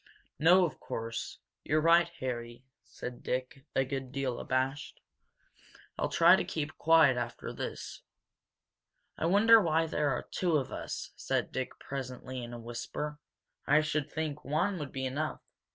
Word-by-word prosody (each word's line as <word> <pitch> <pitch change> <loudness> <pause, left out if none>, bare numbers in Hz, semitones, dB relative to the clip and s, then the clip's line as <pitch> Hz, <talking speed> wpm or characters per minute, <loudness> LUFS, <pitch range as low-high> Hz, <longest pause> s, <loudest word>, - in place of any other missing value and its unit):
"No, 180 +4 +6
of 165 - -5
course 115 0 -5 0.3
not. - - -18
You're 155 - +4
right, 170 +1 +5
Harry," 120 -1 -5 0.2
said 125 -1 -8
Dick, 130 +3 -4
a 135 - +3
good 135 -1 -4
deal 135 -3 -2
abashed. 130 +2 -2 1.0
"I'll - - -1
try - - +7
to - - 0
keep 155 0 -4
quiet 160 -5 +6
after 120 -1 -4
this." - - -6 1.1
"I 160 - -1
wonder 220 +5 +7
why 165 -2 +2
there 150 -2 0
are 125 - -1
two 175 -4 +2
of 135 - -3
us," - - -5
said - - -1
Dick 130 -1 -4
presently, 130 -1 -6
in 120 - -7
a 120 - -6
whisper. 120 +6 -5 0.5
"I 150 +2 +5
should 155 -1 -1
think 155 -2 -3
one 180 +6 0
would 145 -3 -5
be 130 0 -3
enough." 145 +4 -3
140 Hz, 155 wpm, -31 LUFS, 130-155 Hz, 1.1 s, try